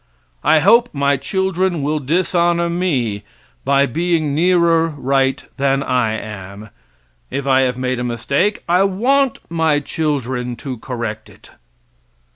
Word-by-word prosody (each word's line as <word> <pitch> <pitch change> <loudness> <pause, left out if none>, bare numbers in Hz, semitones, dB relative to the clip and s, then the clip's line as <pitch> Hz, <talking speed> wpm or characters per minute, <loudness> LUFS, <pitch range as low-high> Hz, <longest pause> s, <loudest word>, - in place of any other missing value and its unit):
I 155 - +4
hope 235 +8 +5
my 140 0 +1
children 185 +2 -1
will 150 +2 0
dishonor 170 +3 +1
me 130 - -1 0.4
by 140 +1 +3
being 160 +1 0
nearer 170 0 +3
right 135 -3 0
than 135 0 +1
I 125 -4 0
am. 105 -1 -8 0.6
If 140 - -4
I 135 -1 +4
have 125 -1 0
made 130 -1 -2
a - - -2
mistake, 140 - -1
I 180 +3 +3
want 250 +7 +1
my 160 -3 +1
children 130 -5 -2
to 130 -1 -7
correct 110 -3 -5
it. - - -18
140 Hz, 130 wpm, -18 LUFS, 125-170 Hz, 0.6 s, hope